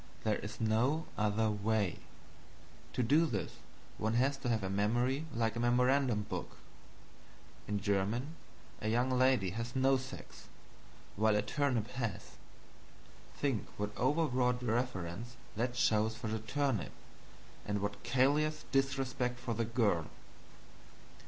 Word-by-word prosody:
There 110 -2 +2
is 105 - -7
no 120 +8 +2
other 105 +1 +1
way. 105 -2 0 0.9
To 125 - +1
do 150 +8 +4
this 105 -9 -3 0.4
one 110 +1 0
has 135 +4 +3
to 135 -2 -3
have 110 -4 +1
a - - -1
memory 120 +9 +1
like 115 -4 0
a - - -2
memorandum 125 -1 +3
book. - - -6 1.1
In 105 -1 -1
German, 105 - 0 0.5
a 110 - 0
young 120 +3 +2
lady 130 -7 +3
has 115 +5 -4
no 135 +1 +4
sex, 130 +1 -9 0.7
while 110 +1 +3
a 105 - +2
turnip 120 -1 0
has. 115 -6 -4 1.0
Think 135 -7 -1
what 105 +1 -3
overwrought 125 -3 +1
reverence 115 -2 -2 0.2
that 120 +3 -1
shows 110 -1 +3
for 115 -1 -4
the 110 0 -1
turnip, 130 -1 -1 0.7
and 105 0 -1
what 100 0 -3
callous 145 +5 +2
disrespect 130 -2 0
for 125 -1 -3
the 115 0 0
girl. 110 -9 +1
120 Hz, 130 wpm, -34 LUFS, 105-130 Hz, 1.1 s, do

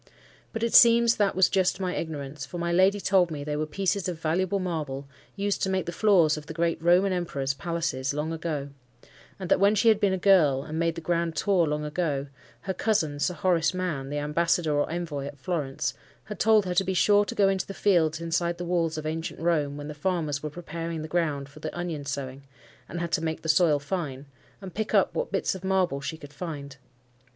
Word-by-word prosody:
But 225 - -4
it 235 - 0
seems 235 0 +7
that 205 -2 +1
was 190 0 +5
just 190 -1 +1
my 185 -2 -2
ignorance; 145 -3 -5
for 135 +6 -7
my 170 0 -1
lady 190 +3 +4
told 185 -3 +3
me 150 -3 -5
they 150 0 -3
were 155 +1 -2
pieces 195 +3 -1
of 170 -3 -5
valuable 175 +5 0
marble, 150 -7 -4 0.3
used 200 0 -1
to 190 - +1
make 190 -1 0
the 170 - -3
floors 175 -6 +3
of 150 0 -9
the 160 - -7
great 170 -1 0
Roman 180 +3 +4
emperors 140 -7 -2
palaces 160 -3 -2
long 150 +3 -2
ago; 155 -4 -3 0.7
and 185 - -5
that - - +5
when 200 +2 +4
she 225 +3 +4
had 215 -2 +4
been 200 -3 +2
a 190 - 0
girl, 165 -8 +4
and 155 +2 -5
made 165 0 +1
the 165 - -6
grand 170 0 -1
tour 185 -5 +2
long 150 0 -2
ago, 150 -3 -1 0.4
her 190 - -3
cousin 180 -8 0
Sir 180 +4 0
Horace 175 +1 +1
Mann, 160 -8 -3
the 145 - -3
Ambassador 155 +2 +1
or 145 0 +1
Envoy 160 -5 -4
at 145 0 -9
Florence, 145 -1 -2 0.3
had 210 -2 -8
told 215 -2 +4
her 180 - -2
to 180 - +3
be 190 0 -2
sure 205 +3 +4
to - - -6
go 200 - +4
into 195 -1 0
the 195 - -7
fields 165 -6 +2
inside 170 +1 -1
the 175 - -5
walls 170 -2 0
of 155 - -5
ancient 160 +1 -4
Rome, 150 -4 0
when 145 0 -7
the 150 - -6
farmers 150 -3 -2
were 150 - -4
preparing 165 0 -5
the - - -5
ground 155 -5 -1
for 145 +2 -15
the 160 - -6
onion 165 -5 -4
sowing, 135 -1 -5 0.5
and 175 - -5
had 170 -1 -3
to 160 - 0
make 160 -1 -3
the 160 - -4
soil 155 -2 +4
fine, 145 -2 -4 0.4
and 190 -3 -8
pick 220 +1 -2
up - - +3
what - - -3
bits - - 0
of 190 -1 -9
marble 185 -7 +1
she 160 +3 -5
could 145 -2 -12
find. 145 -4 -7
170 Hz, 225 wpm, -26 LUFS, 150-185 Hz, 0.7 s, seems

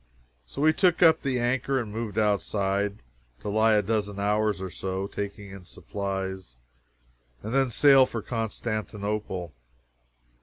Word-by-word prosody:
So 140 - -4
we 155 0 +5
took 180 0 +3
up 160 -1 +6
the 130 -3 -1
anchor 125 +3 0
and 110 -4 -5
moved 110 -1 -5
outside, 100 - 0 0.4
to - - -4
lie 110 +2 +3
a 105 - +3
dozen 105 -1 -1
hours 105 0 +1
or 95 -1 -5
so, 95 +1 -3
taking 100 0 -6
in 95 -1 -10
supplies, 95 -6 -5 0.9
and 110 +3 -4
then 135 -1 +3
sail 135 +2 +6
for 115 -4 -5
Constantinople. 105 -5 -3
105 Hz, 140 wpm, -27 LUFS, 100-120 Hz, 0.9 s, up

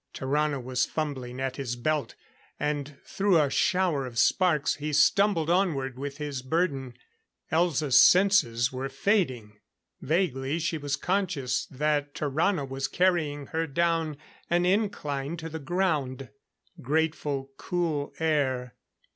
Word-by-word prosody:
Tarrano 145 +1 0
was 130 0 -1
fumbling 130 -5 -4
at 130 -1 -3
his 125 -4 -3
belt; 150 +4 -1 0.4
and 145 -1 -3
through 195 -4 +2
a 145 -3 +2
shower 180 -9 +1
of 120 -2 -9
sparks 160 +1 +2
he 150 +1 -4
stumbled 195 0 +3
onward 150 -8 0
with 140 0 -5
his 145 -3 -4
burden. 135 -3 -1 0.6
Elza's 155 -4 +4
senses 135 - +4
were 130 +1 -3
fading. 135 - -1 0.4
Vaguely 150 -3 0
she 165 -1 -2
was 145 -1 -1
conscious 175 -10 -1
that 145 +1 -1
Tarrano 150 +1 0
was 135 0 -3
carrying 160 -6 +1
her 165 0 0
down 165 0 0 0.3
an 175 +1 +2
incline 170 -7 -1
to 165 0 -6
the 160 0 -6
ground. 145 -5 -1 0.5
Grateful, 145 -1 -1
cool 165 -5 -2
air. 135 -6 0
150 Hz, 125 wpm, -27 LUFS, 135-170 Hz, 0.6 s, Elza's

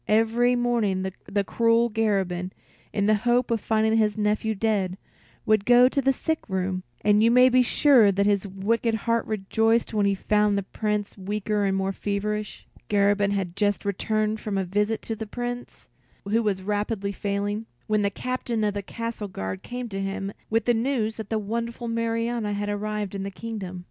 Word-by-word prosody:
Every 225 +3 +3
morning 210 -6 0
the 200 0 0
cruel 230 +3 +3
Garabin, 190 -5 0 0.4
in 200 - 0
the 215 - +4
hope 245 0 +2
of 225 -3 +1
finding 220 0 +2
his 215 -1 +2
nephew 215 +1 0
dead, 195 -3 0 0.5
would 215 -2 +3
go 245 +2 +6
to 275 +2 0
the 270 0 +3
sick 320 +4 -1
room; 185 -1 -1 0.2
and 210 0 +4
you 230 - +5
may 250 +2 +6
be 255 0 +5
sure 250 -3 +5
that 200 +1 +1
his 205 -1 +1
wicked 220 +4 0
heart 230 +1 0
rejoiced 225 +3 +1
when 205 -2 +2
he 200 - +2
found 210 +1 +2
the 200 - -1
Prince 210 0 -3
weaker 205 +1 -1
and 195 0 +1
more 195 0 0
feverish. 205 +1 -3 0.2
Garabin 205 0 +3
had 190 -3 -2
just 205 -1 0
returned 215 +2 0
from 210 -2 -3
a 190 - +1
visit 210 +4 0
to 225 - -3
the 220 0 -6
Prince, 245 +2 -6 0.4
who 220 +3 +2
was 200 -4 -1
rapidly 205 0 -1
failing, 205 +2 -2 0.2
when 215 -1 +1
the 200 - +2
Captain 240 +1 -3
of 210 -1 +1
the 205 - -3
Castle 230 +1 -5
Guard 95 - -5
came 245 0 -5
to 195 -1 -4
him 195 0 -3 0.2
with 225 +1 +1
the 240 - +4
news 225 -2 0
that 220 -3 -7
the 220 - 0
wonderful 230 +3 -3
Marianna 230 -1 -1
had 205 0 -2
arrived 210 -1 -3
in 195 - -4
the 195 - -3
kingdom. 195 -3 -6
210 Hz, 185 wpm, -25 LUFS, 200-230 Hz, 0.5 s, go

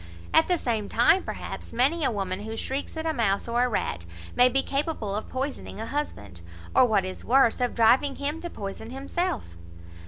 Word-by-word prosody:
At 320 - +5
the 360 - +3
same 225 -8 -2
time, 245 +11 +4
perhaps, - - -6
many 285 +7 +2
a 270 - +3
woman 195 -4 -2
who 220 +2 -6
shrieks 275 +6 -3
at 320 - -3
a 320 - +1
mouse, 210 -6 +1
or 240 +1 +2
a - - 0
rat, 85 - -2 0.3
may 250 +1 +6
be 270 +2 +2
capable 275 -8 -2
of 215 - -4
poisoning 265 -4 -4
a 225 - -3
husband; 100 - -4 0.3
or, 250 - +6
what 205 -4 +2
is 185 - -6
worse, 250 -1 +4
of 245 - 0
driving 260 +5 +4
him 295 +3 -3
to 345 - -5
poison 205 -2 -7
himself. 280 +4 -2
245 Hz, 195 wpm, -26 LUFS, 215-285 Hz, 0.3 s, may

